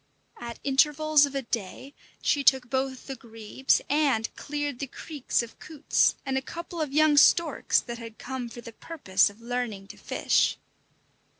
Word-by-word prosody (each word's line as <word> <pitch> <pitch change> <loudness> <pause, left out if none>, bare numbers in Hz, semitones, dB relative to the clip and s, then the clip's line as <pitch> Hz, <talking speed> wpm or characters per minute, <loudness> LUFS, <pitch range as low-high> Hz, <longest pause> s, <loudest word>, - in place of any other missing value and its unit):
At 235 -1 -7
intervals 295 +2 +4
of 280 - -9
a 275 - -1
day 230 +4 -5 0.3
she 285 - +2
took 260 -3 +3
both 265 -1 -2
the 270 - -6
grebes 225 +2 -1
and 275 -7 +1
cleared 290 -3 -4
the 275 - -3
creeks 280 -2 -2
of 230 - -12
coots 310 -2 +1
and 265 -1 0
a - - -10
couple 340 +4 -7
of 300 -3 -2
young 305 0 +4
storks 315 +1 +4
that 235 -1 -7
had 230 -1 -10
come 255 -2 -5
for 240 - -10
the 230 -1 -11
purpose 210 - +1
of 205 +3 -17
learning 235 -4 -4
to - - -11
fish. - - +1
265 Hz, 170 wpm, -27 LUFS, 235-290 Hz, 0.3 s, intervals